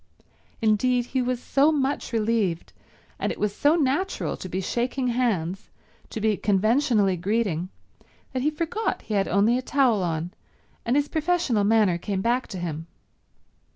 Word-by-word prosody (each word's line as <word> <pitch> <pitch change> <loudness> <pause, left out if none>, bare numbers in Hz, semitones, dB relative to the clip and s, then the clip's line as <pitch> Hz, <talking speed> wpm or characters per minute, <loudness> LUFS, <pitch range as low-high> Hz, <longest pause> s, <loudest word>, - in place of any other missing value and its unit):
Indeed, 240 +3 +2
he 260 +1 -1
was 250 0 -1
so 280 +4 +3
much 280 -2 -1
relieved, 215 -6 0 0.5
and - - -1
it - - -7
was 205 -1 -1
so 295 +3 +3
natural 330 +5 0
to 185 - -8
be 185 - -2
shaking 250 +6 -1
hands, 200 -7 -1 0.4
to 225 - -5
be 215 -1 +1
conventionally 215 0 +2
greeting, 185 -2 -1 0.6
that 255 - -1
he 295 - +2
forgot 335 +8 -2
he 215 - -5
had 195 -1 +1
only 210 +6 +3
a - - -4
towel 255 -6 +2
on 170 0 -2 0.5
and 240 - +2
his 290 0 +2
professional 315 -9 +1
manner 205 -5 +3
came 195 +1 -2
back 245 +2 +1
to 190 - -7
him. 165 -2 -5
230 Hz, 155 wpm, -25 LUFS, 195-260 Hz, 0.6 s, so